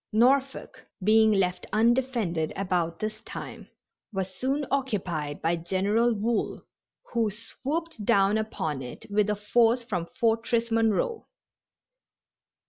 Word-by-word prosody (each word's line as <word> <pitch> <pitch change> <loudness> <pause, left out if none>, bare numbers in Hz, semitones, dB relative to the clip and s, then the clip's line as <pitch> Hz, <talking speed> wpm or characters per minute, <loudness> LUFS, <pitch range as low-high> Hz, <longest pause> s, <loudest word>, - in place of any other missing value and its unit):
Norfolk, 265 +5 +1 0.2
being 220 +2 +5
left 185 -3 0
undefended 230 -8 +1
about 175 -4 -1
this 215 0 -4
time, - - -8 0.4
was 190 -2 -3
soon 270 +8 -1
occupied 185 - -2
by 165 +1 +2
General 195 +7 +1
Wool, 225 +1 -1 0.5
who 230 -2 +2
swooped 270 - -5
down 195 +1 +3
upon 160 -10 -2
it 125 -1 -8
with 210 0 +2
a 210 - +1
force 230 +3 +2
from 180 -8 -3
Fortress 230 0 +1
Monroe. 225 - +1
215 Hz, 115 wpm, -27 LUFS, 190-235 Hz, 0.5 s, being